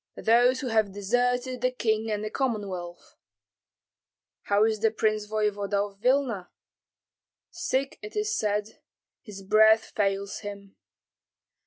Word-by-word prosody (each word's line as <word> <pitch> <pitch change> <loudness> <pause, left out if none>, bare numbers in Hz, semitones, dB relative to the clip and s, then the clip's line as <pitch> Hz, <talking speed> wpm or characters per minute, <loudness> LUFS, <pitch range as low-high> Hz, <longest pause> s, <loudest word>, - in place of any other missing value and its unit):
"Those 245 +4 +3
who 260 - -3
have 215 -3 +1
deserted 245 +5 0
the 255 - +3
king 220 -3 -1
and 210 -1 -2
the 215 - -4
Commonwealth." 195 -9 -4 1.3
"How 205 +1 +3
is 220 -1 0
the 220 +1 +3
prince 215 -1 0
voevoda 210 -1 -1
of 195 - -27
Vilna?" 245 -7 +1 1.0
"Sick, 270 +1 -2
it 425 - -9
is 425 0 0
said; 210 0 -2 0.4
his 205 -5 -10
breath 220 +2 +4
fails 200 -1 -1
him." 200 -1 -9
215 Hz, 125 wpm, -27 LUFS, 205-245 Hz, 1.3 s, breath